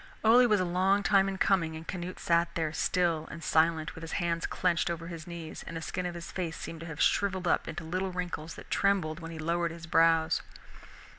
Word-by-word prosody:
Ole 240 +3 +7
was 210 -3 +3
a 185 - +1
long 190 +3 +2
time 195 -1 +4
in 195 - -4
coming, 170 -5 +2
and 160 +1 -9
Canute 180 0 -5
sat 170 0 +1
there, 160 -2 -1
still 165 -2 +1
and 165 - -8
silent, 160 -1 +2
with 160 - -10
his 165 -1 -6
hands 170 -1 -1
clenched 175 -2 +1
on 170 - -1
his 165 0 -8
knees, 170 -2 -7
and 165 - -5
the - - -5
skin 180 +2 -3
of 175 - -6
his 170 0 -7
face 170 -3 -3
seemed 165 - -7
to 165 - -8
have 155 -2 -7
shriveled 190 -2 +2
up - - +2
into 175 - -5
little 185 +4 -2
wrinkles 175 -3 -4
that - - -12
trembled 185 -6 +1
when 165 -1 -7
he 165 - -7
lowered 170 +2 0
his 165 0 -9
brows. 165 -1 +3
170 Hz, 225 wpm, -30 LUFS, 165-185 Hz, -, Ole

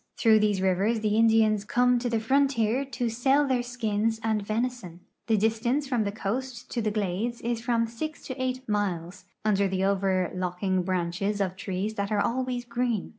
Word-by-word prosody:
Through 220 -2 +5
these 210 -3 +1
rivers 195 +5 +1
the 210 -1 +1
Indians 220 -2 +4
come 245 +3 +2
to 245 0 -2
the 230 -1 +1
frontier 265 0 +2
to 250 -3 -3
sell 265 +5 +2
their 255 -2 +1
skins 225 -2 -1
and 220 -2 +1
venison. 215 -4 -3 0.3
The 220 -2 +3
distance 225 +7 +1
from 245 -5 0
the 200 - -1
coast 240 +4 -4
to 235 - -1
the 215 - 0
glades 210 +3 -2
is 235 -1 -2
from 235 -1 +1
6 265 +7 -6
to 260 0 -5
8 255 0 -2
miles, 185 -3 -2 0.2
under 200 -2 +3
the 190 0 -1
overlooking 185 -1 0
branches 185 +3 -1
of 190 -2 -1
trees 190 +2 -3
that 200 +1 -2
are 210 - +2
always 250 +2 -1
green. 240 -3 -1
220 Hz, 175 wpm, -27 LUFS, 200-245 Hz, 0.3 s, Through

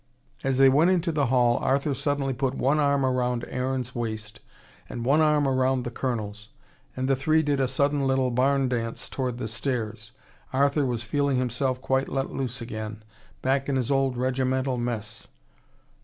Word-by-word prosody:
As 135 -1 +1
they 135 0 +7
went 145 +6 +5
into 175 -2 +1
the 145 -4 +1
hall, 120 -1 +3
Arthur 140 +2 +1
suddenly 140 0 -1
put 135 +1 -1
one 140 +4 +2
arm 140 -2 +2
round 125 -2 0
Aaron's 125 -1 -2
waist, 110 -3 -5 0.5
and 120 -1 -5
one 145 +5 +4
arm 150 -2 +3
round 130 -1 +1
the 120 - -4
Colonel's, 105 -4 -4 0.5
and 130 0 -1
the 135 - +3
three 155 +4 +2
did 145 -2 0
a 135 - +2
sudden 140 +2 +1
little 130 -1 +1
barn 135 +2 +2
dance 115 -2 -3
towards 125 -3 -3
the 125 - -4
stairs. 110 -2 -3 0.4
Arthur 140 +1 +2
was 120 -2 -2
feeling 140 +2 0
himself 125 +1 -1
quite 135 +1 +1
let 135 0 -2
loose 130 -1 -4
again, 110 -2 -6 0.4
back 135 +1 +1
in 140 - +1
his 130 0 0
old 135 -2 +1
regimental 130 +1 0
mess. 110 -3 -4
130 Hz, 170 wpm, -26 LUFS, 120-140 Hz, 0.5 s, they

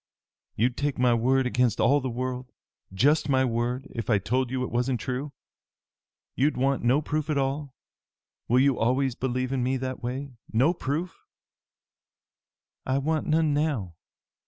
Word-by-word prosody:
"You'd 120 +4 +1
take 145 -1 -1
my 125 -1 +4
word 130 +3 +2
against 125 -2 +1
all 145 +1 +4
the 130 - -2
world 125 +1 -4 0.4
just 145 +10 +2
my 130 -1 +3
word, 120 +2 -1
if 115 0 -5
I 105 - +4
told 125 +6 0
you 130 0 -2
it - - -4
wasn't 125 +1 0
true? 130 +3 -4 1.0
You'd 145 +4 +1
want 135 +1 +1
no 130 +6 +3
proof 155 +1 -2
at 150 - +1
all? 140 0 -2 0.7
Will 125 +2 +4
you 140 -2 +3
always 130 +3 +1
believe 130 +1 -2
in 130 - 0
me 130 +2 +1
in 130 - -4
that 130 -1 -4
way? 130 +3 -4 0.2
No 130 +10 +3
proof?" 165 +2 -4 1.6
"I 130 +1 0
want 155 +3 -1
none 155 -1 +2
now. 145 - -1
130 Hz, 160 wpm, -26 LUFS, 125-140 Hz, 1.6 s, my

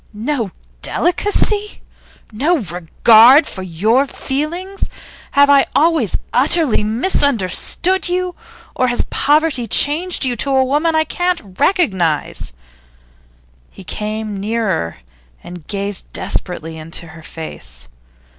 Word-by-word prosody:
'No 230 +1 -2 0.3
delicacy? 410 +3 0 0.5
No 295 +11 +1
regard 220 - +5
for 190 - -7
your 215 - +1
feelings? 340 +10 -4 0.5
Have 285 0 +6
I 280 -1 +5
always 310 - +2 0.2
utterly 275 -2 +2
misunderstood 280 - 0
you? 360 0 -1 0.4
Or 255 - +1
has 245 0 +1
poverty 295 -5 +2
changed 320 +5 +1
you 250 -2 0
to 280 - 0
a 265 0 +4
woman 300 +5 +1
I 315 - +4
can't 340 - -2
recognise?' 190 - +1 1.2
He 195 - -13
came 215 +1 -4
nearer, 200 - -2 0.5
and 175 -3 -10
gazed 200 -2 -3
desperately 160 -2 -4
into 165 +1 -6
her 160 0 -12
face. 155 - -8
245 Hz, 110 wpm, -17 LUFS, 195-315 Hz, 1.2 s, Have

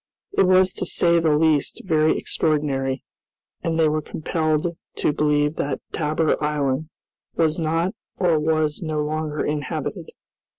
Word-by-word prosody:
It 190 - +4
was 185 0 +4
to - - -3
say 170 -1 +3
the 155 -2 +3
least 155 -2 +1
very 155 -3 +3
extraordinary, 135 -4 -1 0.6
and 165 -1 -1
they 160 - +5
were 155 0 0
compelled 155 +2 -1 0.2
to 150 - +1
believe 150 0 +1
that 140 - -2
Tabor 155 0 0
Island 150 0 0 0.5
was 160 0 +1
not 165 +4 0 0.2
or 170 -4 +3
was 155 -1 0
no 155 -2 -2
longer 155 0 -2
inhabited. 150 -2 -3
155 Hz, 135 wpm, -23 LUFS, 150-165 Hz, 0.6 s, they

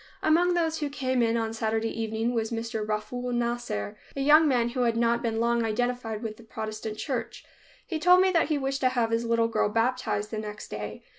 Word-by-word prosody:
Among 350 +3 +3
those 325 -2 0
who 295 -2 -2
came 260 -3 0
in 230 0 +2
on 225 -1 -2
Saturday 225 0 -1
evening 225 +2 -1
was 225 -2 -1
Mr. 225 -1 -3
Rafool 215 +4 -3
Nasser, 235 - -2 0.2
a 275 - -2
young 305 +3 +6
man 240 -4 +2
who 255 +2 -5
had 235 -2 +2
not 235 0 +2
been 225 -1 -1
long 235 0 +2
identified 225 0 -2
with 215 -1 -5
the 235 - -14
Protestant 215 -1 -5
church. - - -4 0.4
He 325 -3 -3
told 360 +3 +6
me 380 0 +4
that 335 -3 +3
he 305 -1 +1
wished 270 0 -2
to 255 - +4
have 240 -3 0
his 230 +1 0
little 230 0 +2
girl 230 - +1
baptized 225 -2 0
the 220 - -3
next 210 0 -7
day. 105 0 -6
235 Hz, 215 wpm, -27 LUFS, 220-255 Hz, 0.4 s, young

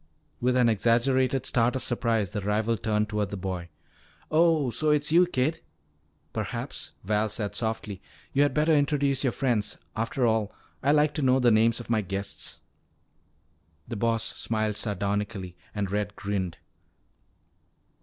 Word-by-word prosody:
With 125 +1 +2
an 125 -2 +5
exaggerated 125 +4 +2
start 120 +1 +2
of 130 - -2
surprise 115 -5 0
the 105 - -3
rival 105 +3 +1
turned 105 -1 0
toward 105 -2 -1
the 100 - -5
boy. 90 -2 -4 0.6
"Oh, 155 -4 +3
so 155 +7 0
it's 150 0 +2
you, 175 +2 +6
kid?" 150 0 0 0.7
"Perhaps," - - -4
Val 105 +2 +1
said 105 -1 -3
softly, 110 -4 -3 0.3
"you 140 - +3
had 145 - +4
better 155 +2 +2
introduce 145 -2 +2
your 130 - +2
friends. 120 -5 0 0.2
After 115 +3 0
all, 110 -2 +1 0.3
I 140 - +3
like 150 0 +3
to 150 - -2
know 130 -1 +4
the 125 -2 +4
names 115 +2 +4
of 120 - -7
my 110 -2 +3
guests." 100 +1 -5 1.3
The 115 - -5
Boss 115 +1 +1
smiled 110 -2 -1
sardonically 100 -2 -2 0.2
and 100 -2 -2
Red 105 0 -2
grinned. 100 -4 -3
115 Hz, 150 wpm, -27 LUFS, 105-130 Hz, 1.3 s, you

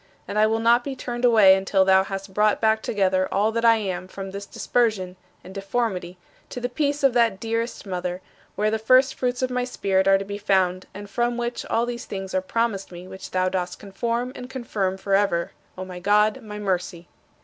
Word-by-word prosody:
And 210 - -2
I 215 - +5
will 220 +1 +1
not 235 +2 +4
be 275 0 -5
turned 245 -1 -3
away 215 -5 +7
until 190 0 +2
thou 190 0 +5
hast 195 0 -6
brought 210 +1 +2
back 220 0 +2
together 190 -3 0
all 205 +3 +2
that 230 +1 -2
I 230 -1 +6
am 185 -4 -3
from 195 0 -7
this 200 +1 -7
dispersion 215 -7 0 0.3
and 185 - -11
deformity 195 -3 -3 0.3
to - - -6
the 245 0 -2
peace 290 +2 -1
of 270 -3 +4
that 230 -5 +2
dearest 230 +1 -3
mother, 180 -1 -3 0.4
where 215 +1 +1
the 220 - -1
first 255 +4 +4
fruits 250 0 -2
of 255 - 0
my 250 0 0
spirit 195 -6 0
are 195 0 +6
to 195 - -5
be 200 +1 -6
found 185 -2 +1
and 205 +1 -8
from 240 +3 -1
which 240 0 -3
all 230 - +1
these 240 -1 -5
things 190 -1 -6
are 185 - +1
promised 205 0 -2
me 175 +1 -10
which 190 - -9
thou 185 0 0
dost 180 -1 -2
conform 235 +5 -3
and 250 -1 -9
confirm 210 -7 -2
forever, 195 -3 +1 0.3
O 185 - -5
my 180 -1 -8
God, 210 +6 +2
my 210 -2 -8
Mercy. 180 -3 -3
205 Hz, 210 wpm, -24 LUFS, 190-235 Hz, 0.4 s, away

